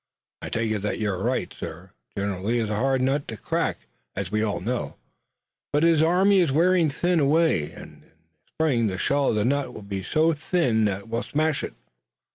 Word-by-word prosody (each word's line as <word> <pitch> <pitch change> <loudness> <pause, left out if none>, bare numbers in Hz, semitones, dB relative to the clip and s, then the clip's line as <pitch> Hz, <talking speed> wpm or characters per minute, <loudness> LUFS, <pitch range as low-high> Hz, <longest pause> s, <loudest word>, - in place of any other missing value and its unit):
"I - - -5
take 115 -1 -1
it 110 - 0
that 105 +1 -2
you're 100 -4 -1
right, - - -1
sir. 90 +4 -8 0.3
General 100 -2 -2
Lee 115 +4 +1
is 110 -2 -1
a - - 0
hard 130 +3 +1
nut 140 +2 0
to 110 - -6
crack, - - -2 0.3
as 95 -1 -4
we 105 0 +1
all 105 -4 -1
know, 120 +7 -3 0.8
but 145 +2 +2
his 165 -2 +4
army 190 +4 +4
is 170 -6 +3
wearing 170 +1 +3 0.3
away. 145 - +2
In - - -12
the - - -24 0.4
spring 130 -8 +1
the 95 -2 -3
shell 140 +7 +1
of - - +1
the 105 0 +1
nut 140 +2 0
will 110 - -8
be 100 -1 -4
so 160 - +2
thin 145 - +1
that 100 +1 -2
we'll 115 +1 -2
smash 155 -1 0
it." - - -6
120 Hz, 200 wpm, -25 LUFS, 105-155 Hz, 0.8 s, his